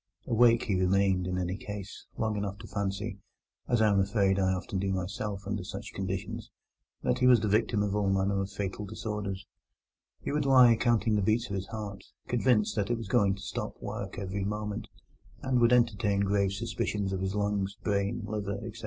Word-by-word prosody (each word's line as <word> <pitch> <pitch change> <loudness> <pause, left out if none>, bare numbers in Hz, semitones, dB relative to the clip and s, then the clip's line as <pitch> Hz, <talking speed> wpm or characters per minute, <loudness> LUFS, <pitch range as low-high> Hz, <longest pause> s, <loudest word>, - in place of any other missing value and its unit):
Awake 115 0 +4
he 105 - -1
remained, 95 0 +2
in 90 0 -1
any 90 0 -1
case, 105 0 -8
long 110 -1 0
enough 100 -1 -3
to 110 +1 -10
fancy 100 +1 -3 0.5
(as 120 -2 +3
I 110 - +5
am 100 - +3
afraid 95 0 +2
I 95 -1 +2
often 95 +1 -2
do 95 0 0
myself 100 +2 -3
under 100 -1 -2
such - - -7
conditions) - - -4 0.5
that 65 - +1
he 125 - +4
was 125 -4 +6
the 110 - 0
victim 105 0 +2
of 100 -1 -1
all 105 -2 +1
manner 95 0 +1
of 95 - -3
fatal 100 0 -4
disorders: 105 -2 -4 0.7
he - - -4
would 150 0 0
lie 125 -3 +7
counting 115 -2 +2
the - - +2
beats 110 +3 +1
of - - -1
his 95 0 -4
heart, 105 -3 -6 0.2
convinced 120 -3 +2
that 100 0 0
it 120 - +1
was 115 -3 -6
going 100 -1 +3
to 100 - -11
stop - - -5
work - - -5
every 100 0 -3
moment, 105 +1 -3 0.6
and 130 -2 +2
would 120 0 +5
entertain 105 -4 +3
grave 100 -1 +2
suspicions 100 -2 -2
of 95 - -2
his 95 +1 -2
lungs, 100 -1 -1
brain, 100 +3 0
liver, 105 -1 -3
etc. 110 +3 -6
100 Hz, 195 wpm, -29 LUFS, 95-110 Hz, 0.7 s, lie